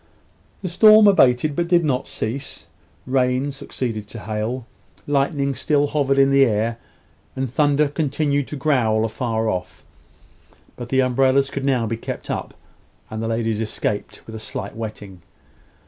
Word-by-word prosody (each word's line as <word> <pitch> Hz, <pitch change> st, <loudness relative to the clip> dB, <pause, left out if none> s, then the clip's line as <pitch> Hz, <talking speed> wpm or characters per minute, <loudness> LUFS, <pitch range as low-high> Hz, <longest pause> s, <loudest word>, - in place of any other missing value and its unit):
The -, -, -2 dB
storm 215 Hz, +4 st, +7 dB
abated, 140 Hz, -5 st, +4 dB
but 170 Hz, +1 st, 0 dB
did 170 Hz, -1 st, +3 dB
not 130 Hz, -2 st, -1 dB
cease. 135 Hz, +6 st, -4 dB, 0.4 s
Rain 130 Hz, +1 st, +1 dB
succeeded 115 Hz, -5 st, -5 dB
to 110 Hz, 0 st, -9 dB
hail, 110 Hz, +4 st, -3 dB, 0.4 s
lightning 140 Hz, 0 st, 0 dB
still 145 Hz, +3 st, +1 dB
hovered 140 Hz, -2 st, 0 dB
in 135 Hz, 0 st, +5 dB
the 135 Hz, 0 st, +6 dB
air, 115 Hz, -1 st, 0 dB, 0.6 s
and 130 Hz, -2 st, -3 dB
thunder 145 Hz, +1 st, +3 dB
continued 145 Hz, -1 st, -1 dB
to -, -, -6 dB
growl 115 Hz, -7 st, +1 dB
afar 115 Hz, 0 st, -2 dB
off. 90 Hz, -4 st, -4 dB, 0.9 s
But 120 Hz, -1 st, -8 dB
the 130 Hz, +1 st, +3 dB
umbrellas 135 Hz, +2 st, +2 dB
could 140 Hz, -1 st, -4 dB
now 130 Hz, -4 st, +1 dB
be 115 Hz, +1 st, -3 dB
kept -, -, -6 dB
up, -, -, -5 dB, 0.6 s
and 110 Hz, 0 st, -4 dB
the 115 Hz, -, -2 dB
ladies 115 Hz, -1 st, -1 dB
escaped 105 Hz, -1 st, -3 dB
with 110 Hz, -, -10 dB
a 110 Hz, -, -6 dB
slight 110 Hz, -, -6 dB
wetting. 105 Hz, -4 st, -7 dB
130 Hz, 150 wpm, -21 LUFS, 115-140 Hz, 0.9 s, storm